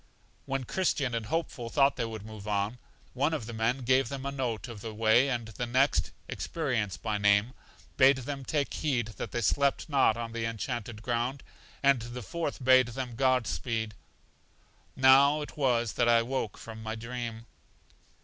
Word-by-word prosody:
When 135 -1 -1
Christian 140 -4 0
and 115 -2 -2
Hopeful 140 -5 -2
thought 140 +3 +3
they - - -1
would 110 -2 -7
move 110 -1 -9
on, 105 +3 -1 0.3
one 145 +5 +1
of 120 - -4
the 120 - -7
men 115 +4 0
gave 130 0 +3
them 135 -1 -5
a 140 - -2
note 130 -4 -3
of 115 -4 -9
the 110 -1 -6
way, 115 +5 +4
and 120 -4 -2
the 120 +3 -4
next 130 +4 +2 0.2
(Experience 120 - -2
by 105 -2 -2
name) 100 +4 +3 0.4
bade 135 0 +6
them 135 +2 -5
take 145 +1 -1
heed 125 -7 -1
that - - -4
they 120 - -2
slept 140 +7 +1
not 135 -6 +3
on 115 -1 -4
The 115 0 -3
Enchanted 115 -1 -4
Ground, 120 +3 -1 0.4
and 140 -3 +4
the 120 +1 -7
fourth 155 - -4
bade 130 -1 +6
them 125 +1 -5
God 130 -1 +2
Speed. 110 -1 -2 1.0
Now 135 +3 +6
it - - -10
was 120 -7 +1
that 120 -1 +2
I 115 -1 +5
woke 120 -4 -3
from 110 -1 -9
my 110 0 -4
dream. 115 0 -6
120 Hz, 180 wpm, -29 LUFS, 115-135 Hz, 1.0 s, bade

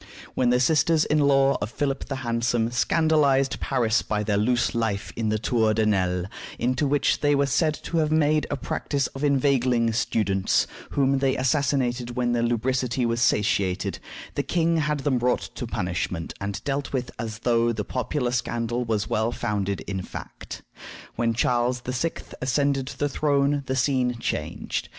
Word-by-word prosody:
When 125 -2 +2
the 125 0 +3
sisters 160 +4 +3
in 150 - +2
law 140 -1 +3
of 105 - -2
Philip 135 +2 -2
the 135 - -4
Handsome 115 0 0
scandalized 140 0 +2
Paris 115 -1 +1
by 105 -1 -2
their 105 -1 0
loose 120 +4 +1
life 110 -4 -2
in 110 -2 -1
the 110 - +1
Tour 110 -1 +1
de 110 0 +2
Nesle, 90 -4 +1 0.3
into 130 +4 0
which 145 +1 +2
they 145 -1 +3
were 140 0 +3
said 155 +3 +1
to 165 -2 0
make 155 -1 +2
a 145 - -2
practice 140 -1 -2
of 135 - -6
inveigling 130 -5 +2
students, 100 -4 +1 0.2
whom 135 -1 +2
they 135 0 +1
assassinated 130 -2 0
when 125 -1 0
their 120 -1 +1
lubricity 125 +1 0
was 115 0 0
satiated, 100 -5 +1 0.3
the - - 0
king 165 -1 +1
had 150 -2 0
them 135 -3 +1
brought 125 +1 0
to 120 - -5
punishment 90 -4 -3
and 100 0 -4
dealt 140 0 -2
with 130 -2 -2
as 110 -2 -4
though 115 0 +2
the 105 -3 -3
popular 125 0 -2
scandal 120 0 -1
was 110 -3 -1
well 110 +2 0
founded 100 -4 -2
in 95 -2 -4
fact. - - -9 0.5
When 115 -1 0
Charles 120 +1 +1
VI. 130 +7 -1 0.3
ascended 135 +1 +1
the 145 +1 -2
throne 145 0 +1
the 130 - -1
scene 125 -2 +1
changed. - - -3
125 Hz, 165 wpm, -25 LUFS, 115-140 Hz, 0.5 s, the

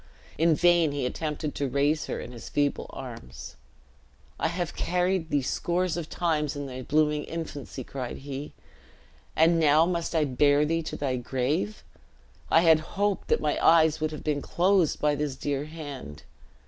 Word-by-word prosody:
In 165 0 +4
vain 170 -3 +4
he 140 -3 -2
attempted 150 +2 -3
to 140 -2 -2
raise 145 +4 +1
her - - -3
in - - -7
his 120 -3 -9
feeble 145 -1 0
arms. 115 - -9 0.8
"I - - +1
have 175 0 -3
carried 180 -1 0
thee 145 -3 +1
scores 175 +6 -1
of 170 -2 -5
times 155 -4 0
in 145 0 -4
thy 130 -1 -6
blooming 150 +2 +1
infancy," 145 -5 -6
cried 125 -1 -6
he; 140 +1 -6 0.8
"and 165 +1 +4
now 155 +1 +5
must 170 -1 -2
I 155 -2 +3
bear 145 +2 +3
thee 165 +2 0
to 160 - -6
thy 130 -3 -1
grave? 135 - -2 0.7
I 165 - +5
had 160 -2 +6 0.2
hoped 205 -1 0
that - - +2
my 150 -1 0
eyes 160 -1 +5
would 155 - +1
have 155 - -8
been 150 -2 -1
closed 180 0 +2
by 150 0 +2
this 145 -2 -2
dear 140 0 -2
hand." 145 - -8
150 Hz, 170 wpm, -27 LUFS, 140-165 Hz, 0.8 s, had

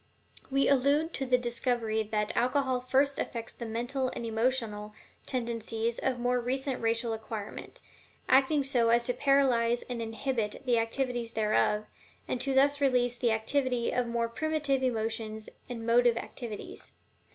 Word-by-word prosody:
We 275 0 +2
allude 280 +4 +3
to 270 - -3
the 250 0 +4
discovery 240 -2 0
that 210 -1 -2
alcohol 255 +1 +1
first 270 +2 +1
affects 230 -2 -4
the 235 - -7
mental 245 +4 -1
and 235 - -4
emotional 225 -2 -1 0.3
tendencies 230 -2 -2
of 260 -2 0
more 245 0 +1
recent 265 +2 -2
racial 230 0 0
acquirement, 220 -1 -7 0.5
acting 275 +2 +4
so 245 -4 +2
as 235 +1 +4
to 245 - 0
paralyze 250 -3 +2
and 245 -2 -5
inhibit 225 0 -3
the 240 -2 +3
activities 235 0 -2
thereof, 210 -1 +1 0.4
and 245 - -2
to 270 +1 -1
thus 285 +2 +4
release 245 -3 +2
the 240 - +2
activity 245 +2 0
of 250 -1 0
the - - -5
more 235 0 0
primitive 295 +1 -1
emotions 220 -3 -2 0.2
and 230 -2 -5
motive 235 0 +4
activities. 235 -3 -7
245 Hz, 150 wpm, -30 LUFS, 230-265 Hz, 0.5 s, the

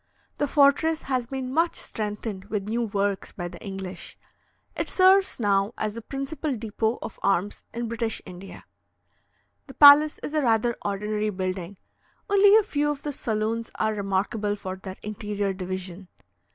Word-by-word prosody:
The 290 - +1
fortress 295 +3 +3
has 255 -3 -1
been 260 0 -4
much 330 +3 +2
strengthened 210 -2 -5
with 205 -1 -3
new 230 +3 -1
works 200 -3 -1
by 175 - -5
the - - -11
English. 190 -2 -7 0.6
It - - -2
serves 380 -2 +4
now 200 0 +1
as 215 -1 -2
the 230 - -7
principal 275 +3 -4
depot 220 +1 -1
of - - -8
arms 195 +1 0
in 235 0 -4
British 230 -1 -2
India. 185 +2 -11 1.0
The 270 - -12
palace 295 +1 +8
is 300 - -5
a 305 - +2
rather 235 -1 +2
ordinary 210 +1 -1
building; 185 -1 -4 0.5
only 405 +1 +7
a 440 - +4
few 295 -6 0
of 290 -1 -4
the 295 - -3
saloons 225 0 -2
are 220 0 0
remarkable 205 +1 -1
for 185 -2 -6
their 190 0 -9
interior 205 -1 -3
division. 185 0 -6
215 Hz, 155 wpm, -25 LUFS, 195-270 Hz, 1.0 s, palace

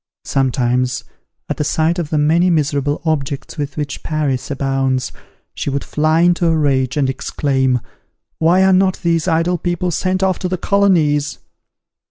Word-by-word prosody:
Sometimes, 125 -1 0 0.4
at - - -3
the - - 0
sight 160 +4 0
of 160 -4 -3
the 155 - 0
many 165 +5 +3
miserable 145 -2 0
objects 145 -1 -2
with 145 0 -4
which 145 -1 -4
Paris 145 -4 -2
abounds, 135 -2 -1 0.4
she - - -3
would 140 0 -2
fly 155 +2 +1
into 175 0 +3
a 165 -1 +2
rage, 135 -3 +1
and 140 -2 +2
exclaim, 130 -1 0 0.6
"Why 175 +4 +4
are 190 0 +4
not 185 0 +3
these 165 0 +1
idle 170 +1 +1
people 175 +1 -1
sent 185 +3 -1
off 190 -2 +1
to 185 - -2
the 185 - -1
colonies?" 165 -8 +2
155 Hz, 160 wpm, -18 LUFS, 135-175 Hz, 0.6 s, Why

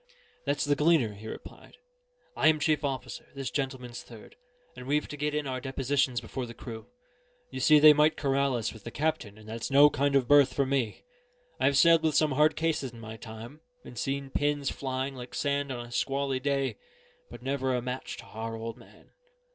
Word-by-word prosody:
"That's 145 0 0
the 145 0 +2
Gleaner," 150 -7 +3
he 105 +2 -10
replied. 110 - -10 0.6
"I - - +3
am 155 -1 +4
chief 155 0 +1
officer, 135 -2 -4
this 135 -2 -4
gentleman's 130 -3 -4
third; 115 -3 -14 0.4
and 125 0 -9
we've 150 +2 +1
to - - -7
get 150 +1 -2
in 150 -1 -1
our 130 -1 -3
depositions 135 -1 0
before 130 -2 -5
the 115 - -10
crew. 110 -2 -9 0.6
You 130 - -5
see 150 +4 +6
they 150 0 +9
might 150 +1 +3
corral 140 -2 +1
us 115 -2 -2
with 110 -3 -13
the - - -6
captain; 120 -7 -2
and 110 0 -15
that's 115 +1 -5
no 145 +2 +7
kind 140 +1 +1
of 130 -3 +3
berth 145 -1 +6
for 140 - +2
me. 130 -4 -1 0.6
I've 140 -1 +3
sailed 165 +1 +6
with 160 -2 +1
some 155 -1 +3
hard 150 +3 +3
cases 160 -5 -1
in 115 - -11
my 110 0 -8
time, 115 +6 -10 0.2
and - - -10
seen 135 +2 -3
pins 145 -1 0
flying 130 0 -3
like 125 -1 -9
sand 140 -1 -1
on 120 -2 -5
a 120 - -13
squally 135 +1 -1
day 135 -4 -1 0.5
but - - -11
never 135 -1 0
a - - +1
match 125 +1 -5
to - - -10
our 115 +1 -6
old 115 0 -6
man. - - -19
135 Hz, 205 wpm, -29 LUFS, 120-145 Hz, 0.6 s, they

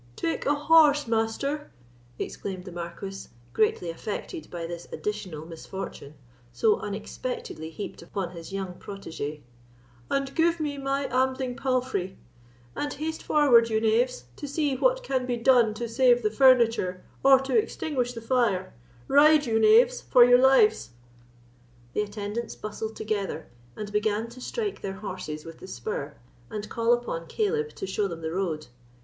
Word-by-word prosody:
"Take 330 -4 -2
a 290 - +3
horse, 295 -1 +5
Master," 235 +6 -1 0.5
exclaimed 185 -2 -5
the 185 - -8
Marquis, 175 +3 -7 0.3
greatly 180 - +1
affected 220 - -6
by 170 -1 -5
this 170 0 -7
additional 185 -7 -4
misfortune, 165 -3 -8 0.4
so 205 - +2
unexpectedly 330 - -5
heaped 180 +6 -7
upon 175 +1 -4
his 170 +1 -9
young 195 -2 -4
protege; 155 -7 -6 0.7
"and 275 0 -1
give 335 0 +2
me 290 -2 -2
my 275 0 -1
ambling 260 0 0
palfrey; 255 -8 -1 0.6
and 290 - -2
haste 315 +1 -4
forward, 245 -6 +5
you 220 -1 +2
knaves, 225 - +1
to - - -6
see 285 -1 0
what - - +2
can 260 - -1
be 245 -1 -1
done 235 -2 +5
to 235 +1 -3
save 245 +1 +4
the 215 - +1
furniture, 230 -7 +4 0.2
or 270 -1 +7
to 270 0 -2
extinguish 270 - 0
the 230 - -7
fire—ride, 225 - +2
you 225 -2 +1
knaves, 475 - +5
for 245 -1 +6
your 245 0 +6
lives!" 270 - +4 1.0
The - - +1
attendants 210 +2 -4
bustled 220 +1 -5
together, 210 -2 -3 0.3
and 210 -1 -6
began 210 +2 0
to 245 +2 -12
strike 420 - -3
their 195 - -4
horses 185 -6 -6
with 165 -1 -10
the - - -10
spur, 140 -1 -5 0.3
and 210 -1 -5
call 230 0 +1
upon 240 -9 -1
Caleb 445 +1 -1
to - - -5
show 195 +2 -1
them 170 -3 -7
the 160 0 -3
road. 170 -5 -2
230 Hz, 150 wpm, -27 LUFS, 190-275 Hz, 1.0 s, or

